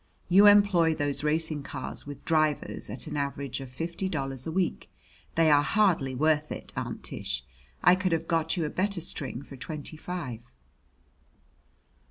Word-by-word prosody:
You 195 +3 +8
employ 200 -6 +5
those 145 -1 -2
racing 155 0 0
cars 140 - -6
with 145 -1 -9
drivers 155 -7 0
at 110 - -4
an 150 -1 -5
average 140 -2 -3
of 135 - -8
fifty 170 +8 -3
dollars 135 -4 -2
a - - -2
week. 180 +1 -1 0.5
They 160 -1 +5
are 145 -1 +6
hardly 160 -6 +2
worth 155 +2 +2
it, - - -7
Aunt - - -4
Tish. 65 0 -3 0.4
I 180 - +8
could 185 0 +1
have 165 - 0
got 165 +1 +1
you 165 - 0
a - - -2
better 195 0 0
string 140 -5 -4
for 140 - -11
twenty 155 +3 -6
five." 140 - -6
155 Hz, 165 wpm, -28 LUFS, 140-170 Hz, 0.5 s, You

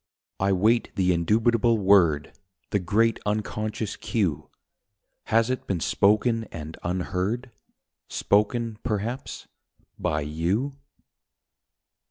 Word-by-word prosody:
I 100 +1 +2
wait 110 +5 +2
the 90 -1 +2
indubitable 115 +6 +2
word, 95 -7 +3 0.4
The 100 - +2
great 110 +5 +2
Unconscious 105 0 -2
Cue. 85 -9 -2 0.8
Has 115 +2 +2
it 130 - -4
been 95 -3 -1
spoken 110 +6 +2
and 80 -3 -8
unheard? 95 +7 -2 0.6
Spoken, 110 +2 +1
perhaps, 115 +3 -3 0.5
by 75 - 0
you 85 - -1
105 Hz, 95 wpm, -25 LUFS, 90-115 Hz, 0.8 s, word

